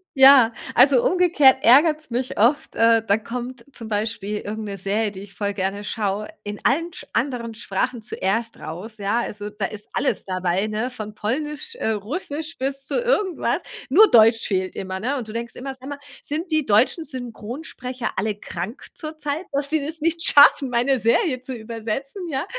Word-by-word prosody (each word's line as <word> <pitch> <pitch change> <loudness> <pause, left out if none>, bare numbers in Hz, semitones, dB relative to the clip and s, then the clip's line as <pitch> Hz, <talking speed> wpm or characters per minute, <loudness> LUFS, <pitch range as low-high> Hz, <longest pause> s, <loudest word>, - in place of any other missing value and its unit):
Ja. 265 -3 +8 0.2
Also 255 -1 +6
umgekehrt 305 -8 +4
ärgert's 305 +5 +5
mich 250 +2 -3
oft. 245 +8 +2
Äh, 230 -1 +4
da 200 +2 +4
kommt 240 +2 -6
zum 225 -2 -8
Beispiel 210 -1 -2
irgend 215 +1 -5
'ne 200 - -5
Serie, 205 +3 -1
die 195 -1 -9
ich 200 -1 -12
voll 205 -1 -2
gerne 195 +1 -3
schaue, 210 -1 -2 0.2
in 205 0 -6
allen 330 +6 +1
sch - - -8
anderen 235 -2 -2
Sprachen 230 +3 -2
zuerst 225 +3 -2
raus, 185 +8 -7
ja, 205 +4 0
also 210 -3 -5
da 210 -1 -4
ist 210 +1 -7
alles - - 0
dabei, 185 +2 -1
ne, 220 +4 -2
von 215 -4 -8
polnisch, 300 - -3
äh, 220 - -1
russisch 295 - -4
bis 270 +1 -2
zu - - -1
irgendwas. 420 -7 0 0.3
Nur 395 +9 +6
deutsch 225 0 +6
fehlt 185 -2 -1
immer, 190 0 -5
ne, 260 +7 -1
und 235 - -5
du - - -7
denkst 235 0 -5
immer: 270 +1 -6
„Sag 260 +1 -12
mal, 285 0 -6 0.2
sind 320 +4 -3
die 310 -2 +1
deutschen 235 - +3
Synchronsprecher 250 0 -6
alle 210 +1 -1
krank 205 - -7
zurzeit, 310 +1 -4
dass 280 0 -1
die 315 +1 +1
das 315 0 +3
nicht 330 +1 +1
schaffen, 285 -1 +7
meine 245 +2 +1
Serie 255 - +2
zu 255 0 -5
übersetzen, 230 - -5
ja?“ 275 +3 -2
235 Hz, 180 wpm, -22 LUFS, 210-285 Hz, 0.3 s, Ja